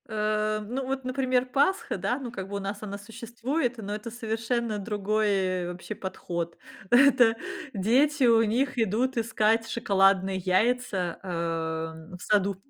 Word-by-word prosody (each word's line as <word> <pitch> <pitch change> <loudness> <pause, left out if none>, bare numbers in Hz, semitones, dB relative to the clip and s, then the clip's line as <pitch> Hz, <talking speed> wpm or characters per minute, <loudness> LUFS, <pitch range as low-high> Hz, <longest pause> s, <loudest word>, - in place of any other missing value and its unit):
Э, 215 0 0
ну, 260 +4 -3
вот, 265 -1 -3
например, 255 -1 +1
Пасха, 285 - +1
да, 245 - -1
ну, 250 -4 -6
как 190 -5 -6
бы 200 - -5
у - - -1
нас 200 +1 -4
она 200 -2 -5
существует, 235 +5 -3
но 205 -2 -5
это 215 +2 -5
совершенно 225 -1 -2
другой 200 -3 0
вообще 180 +4 -7
подход. 170 -3 -5 0.3
Это 245 -3 +6 0.4
дети 260 +9 +2
у 230 -1 +5
них 250 +5 0
идут 230 +4 +1
искать 225 0 +2
шоколадные 195 -3 +2
яйца, 190 -1 0
эм, 160 -1 -4
в - - -17
саду. 200 -2 +2
215 Hz, 140 wpm, -27 LUFS, 195-245 Hz, 0.4 s, Это